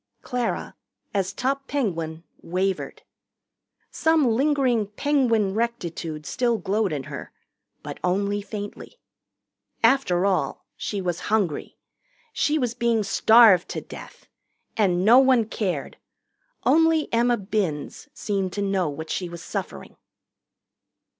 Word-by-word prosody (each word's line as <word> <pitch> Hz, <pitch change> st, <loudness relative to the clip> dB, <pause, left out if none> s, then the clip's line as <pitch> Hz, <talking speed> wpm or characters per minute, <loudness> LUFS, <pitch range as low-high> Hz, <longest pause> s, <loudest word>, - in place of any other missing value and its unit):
Clara, 245 Hz, -2 st, -3 dB, 0.4 s
as 195 Hz, -2 st, 0 dB
top 270 Hz, +6 st, -2 dB
Penguin, 165 Hz, -, -2 dB, 0.2 s
wavered. 185 Hz, +2 st, -2 dB, 0.9 s
Some 320 Hz, -2 st, +2 dB
lingering 250 Hz, -2 st, +2 dB
Penguin 225 Hz, -3 st, +1 dB
rectitude 170 Hz, -9 st, -3 dB
still 240 Hz, -, 0 dB
glowed 200 Hz, +2 st, 0 dB
in 145 Hz, -3 st, -3 dB
her, -, -, -8 dB, 0.5 s
but -, -, -7 dB
only 200 Hz, +3 st, 0 dB
faintly. 205 Hz, -, -8 dB, 0.9 s
After 225 Hz, -7 st, +3 dB
all, 195 Hz, -2 st, -1 dB
she 205 Hz, -2 st, -4 dB
was 175 Hz, -2 st, -2 dB
hungry. 200 Hz, -8 st, -1 dB, 0.6 s
She 300 Hz, +1 st, +1 dB
was 245 Hz, -5 st, -1 dB
being 235 Hz, -2 st, +1 dB
starved 210 Hz, -2 st, +5 dB
to -, -, -3 dB
death. -, -, -12 dB, 0.5 s
And 185 Hz, -4 st, +2 dB
no 235 Hz, +4 st, +8 dB
one 260 Hz, -4 st, +4 dB
cared. 185 Hz, -9 st, -3 dB, 0.7 s
Only 325 Hz, 0 st, +4 dB
Emma 240 Hz, +1 st, +3 dB
Binns 195 Hz, -7 st, -3 dB
seemed 195 Hz, -3 st, -2 dB
to 205 Hz, -, -3 dB
know 195 Hz, -4 st, 0 dB
what 160 Hz, +2 st, -6 dB
she 180 Hz, -2 st, -2 dB
was 170 Hz, 0 st, -9 dB
suffering. -, -, -6 dB
210 Hz, 115 wpm, -24 LUFS, 185-240 Hz, 0.9 s, no